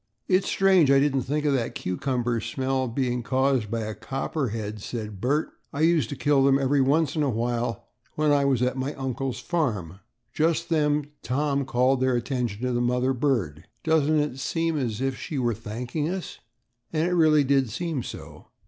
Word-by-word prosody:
"It's 190 0 +2
strange 190 -6 +4
I 140 0 +6
didn't 140 -1 +2
think 145 +4 -2
of 145 - +3
that 120 -4 -1
cucumber 120 +4 -1
smell 130 +2 -1
being 125 0 -1
caused 130 -2 +1
by 115 +1 -2
a 110 0 -4
copperhead," 115 -6 -3
said 105 -3 -6
Bert; 145 +6 0 0.2
"I 145 - -4
used 160 -7 +3
to - - -4
kill 140 0 +3
them 135 0 +5
every 140 +1 +2
once 145 +3 +2
in 155 - +1
a 145 - +2
while 120 0 -2 0.3
when 150 -1 +2
I 145 -1 +4
was 135 -3 +2
at 125 +1 0
my 135 +2 -3
uncle's 130 -1 -3
farm." 105 - -2 0.3
Just 165 +1 +1
then, 150 -2 +1
Tom 140 +1 0
called 130 +1 +2
their 130 -1 +2
attention 120 -3 -2
to 125 - 0
the 120 - +1
mother 125 +2 +1
bird. 115 - -1 0.2
"Doesn't 155 -1 +3
it 150 - +3
almost 135 -2 -5
seem 165 -1 0
as 120 -6 -2
if 135 -1 -1
she 150 - -5
were 120 -3 +1
thanking 120 +8 -4
us?" 185 0 -5 0.5
And 160 +1 +1
it 180 - 0
really 155 -4 +5
did 135 -2 +2
seem 160 +4 -3
so. - - -9
135 Hz, 190 wpm, -25 LUFS, 120-150 Hz, 0.5 s, I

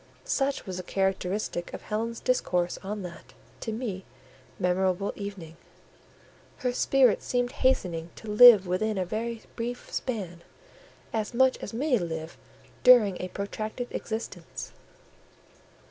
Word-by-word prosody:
Such 280 - 0
was 185 -3 -5
the - - -3
characteristic 190 -1 -1
of - - -10
Helen's 225 +2 -3
discourse 180 -8 0
on 205 +1 -5
that, 175 -1 -10 0.3
to 225 - -4
me, 215 -5 -4 0.5
memorable 185 +1 +1
evening; 190 -6 -7 1.1
her 250 - +2
spirit 255 -2 +4
seemed 245 0 0
hastening 180 - 0
to 220 - -11
live 210 -1 +9
within 200 +4 0
a 185 - 0
very 225 +4 -4
brief 245 +1 -5
span 190 -9 -3 0.7
as 220 +1 -2
much 260 +1 +5
as - - -6
many 250 +1 +1
live 160 -2 -5 0.5
during 230 -7 +6
a 185 - -3
protracted 215 +5 -5
existence. 220 +1 -5
210 Hz, 125 wpm, -28 LUFS, 185-245 Hz, 1.1 s, live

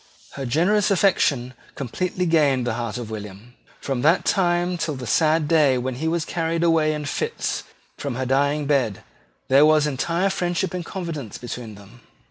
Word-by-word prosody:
Her 135 -2 -5
generous 190 - +2
affection 155 -10 +2 0.2
completely 180 +8 -2
gained 145 -7 +2
the 120 - -1
heart 115 -1 -4
of 115 -3 -6
William. 105 +2 -8 0.3
From 135 -3 -3
that 165 +6 +3
time 175 -1 +1
till 165 -3 -2
the 130 -1 -7
sad 155 +4 +2
day 150 -5 +4
when 130 +1 -2
he 145 +6 -3
was 165 -1 0
carried 165 0 -1
away 165 -2 +3
in 150 -1 -5
fits 145 - -3 0.3
from 140 -4 -3
her 130 +1 -2
dying 140 +3 +1
bed, 130 -8 0 0.4
there 135 +2 +6
was 155 -1 +5
entire 170 +7 0
friendship 180 -1 -1
and 180 -1 -3
confidence 165 - -6
between 120 -3 -7
them. 100 +4 -15
150 Hz, 170 wpm, -23 LUFS, 125-170 Hz, 0.4 s, there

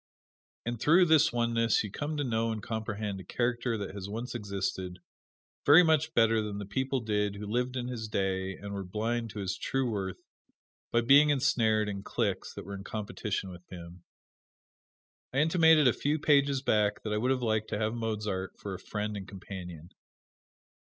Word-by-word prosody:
And 120 -1 -3
through 170 +6 +6
this 160 -2 +5
oneness 115 -1 +2
you 105 - -6
come 150 +5 -3
to 145 - 0
know 115 -2 0
and 110 -2 -5
comprehend 110 -3 -3
a - - -8
character 120 +1 -1
that 100 -2 -5
has 100 -1 -6
once 115 +4 -5
existed, 100 -4 -3 0.7
very 155 +5 +8
much 160 -2 +2
better 115 -1 +4
than 105 -1 -4
the 100 - -5
people 130 +6 -1
did 105 -2 0
who 105 +1 -6
lived 125 +4 -1
in 125 -1 -2
his 115 -3 -4
day 95 -2 -1
and 100 0 -7
were 100 -1 -4
blind 115 +5 -2
to 105 - -7
his 95 0 -2
true 135 +4 -1
worth 95 -3 -3 0.7
by 120 - +3
being 140 +5 +6
ensnared 110 -6 +2
in 100 -1 -4
cliques 100 -3 -2
that - - -7
were 100 - -7
in 100 0 -7
competition 105 -2 -4
with 90 -1 -11
him. 85 -1 -10 1.3
Elkhart: - - -41
I - - -2
intimated 160 -3 +5
a 120 - +5
few 150 +2 0
pages 140 -3 +3
back 105 -4 +1
that 105 - -2
I - - +1
would 125 +4 0
have 130 -1 +1
liked 110 -1 0
to - - -2
have 110 +1 -1
Mozart 105 -5 -3
for 100 - -6
a 95 - -6
friend 105 0 -4
and 100 -1 -6
companion. 90 -4 -8
110 Hz, 190 wpm, -30 LUFS, 100-125 Hz, 1.3 s, very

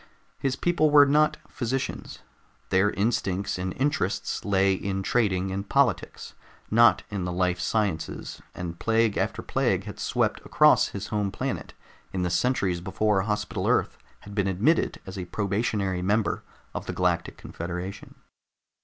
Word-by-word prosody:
His 135 -1 0
people 170 -3 +2
were 145 -1 +8
not 150 +2 +3
physicians. 130 +1 -4 0.5
Their 95 +2 +4
instincts 100 -3 -1
and 95 +1 -2
interests 130 -9 -1
lay 100 -1 +3
in 95 0 -2
trading 95 -4 +1
and 100 +1 -4
politics, 125 -11 0 0.4
not 115 -3 +5
in 100 -3 -2
the 90 - -2
life 90 0 0
sciences, 100 -8 -2
and 85 -1 -6
plague 115 -1 +2
after - - -1
plague - - 0
had - - -9
swept - - 0
across - - +5
his 100 0 -6
home 105 -2 -1
planet - - -4 0.4
in 95 -1 -1
the 90 - -1
centuries 95 -6 +1
before 100 +2 +1
Hospital 105 +1 -2
Earth - - +1 0.2
had 100 - -11
been 100 -2 0
admitted 105 - +1
as 95 0 -7
a 90 - -4
probationary 100 -1 -1
member 105 +4 +1 0.3
of - - -5
the - - -3
Galactic 90 -2 0
Confederation. 90 +3 -6
100 Hz, 145 wpm, -26 LUFS, 95-115 Hz, 0.5 s, were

